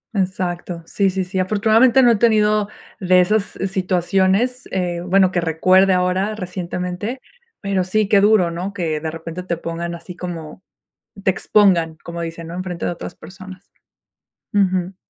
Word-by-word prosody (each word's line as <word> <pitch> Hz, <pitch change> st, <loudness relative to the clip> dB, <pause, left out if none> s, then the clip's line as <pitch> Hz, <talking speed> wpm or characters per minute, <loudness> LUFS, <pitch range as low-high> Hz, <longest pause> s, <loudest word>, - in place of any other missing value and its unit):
Exacto, 180 Hz, -3 st, -2 dB
sí, 195 Hz, +3 st, +1 dB
sí, 190 Hz, 0 st, -2 dB
sí. 185 Hz, +1 st, -4 dB
Afortunadamente, 220 Hz, +7 st, +4 dB
no 240 Hz, -, +6 dB
he -, -, +4 dB
tenido 215 Hz, -2 st, +3 dB, 0.3 s
de 185 Hz, -2 st, +4 dB
esas 205 Hz, +4 st, +3 dB, 0.2 s
situaciones, 190 Hz, +6 st, 0 dB
eh, 175 Hz, -2 st, -2 dB
bueno, 185 Hz, +1 st, +3 dB
que 180 Hz, -, 0 dB
recuerde 185 Hz, +4 st, +3 dB
ahora 185 Hz, +3 st, 0 dB
recientemente. 180 Hz, +4 st, -4 dB, 0.4 s
Pero 195 Hz, -2 st, 0 dB
sí, 210 Hz, +3 st, 0 dB
qué 200 Hz, -1 st, +4 dB
duro, 205 Hz, -4 st, +4 dB
¿no?, 180 Hz, +4 st, -5 dB
que 165 Hz, -5 st, -2 dB
de 160 Hz, +1 st, -4 dB
repente 165 Hz, +2 st, -7 dB
te 175 Hz, -2 st, -3 dB
pongan 170 Hz, +1 st, -5 dB
así 170 Hz, +2 st, -10 dB
como 170 Hz, -2 st, -7 dB, 0.6 s
te 190 Hz, -, +3 dB
expongan, 180 Hz, -5 st, +2 dB
como 170 Hz, 0 st, -6 dB
dicen, 165 Hz, 0 st, -6 dB
¿no?, 165 Hz, -, -8 dB
enfrente 180 Hz, -2 st, -4 dB
de -, -, 0 dB
otras 170 Hz, -, -8 dB
personas. 190 Hz, +1 st, -13 dB, 0.8 s
Ujú. 185 Hz, -2 st, +1 dB
185 Hz, 155 wpm, -20 LUFS, 175-200 Hz, 0.8 s, no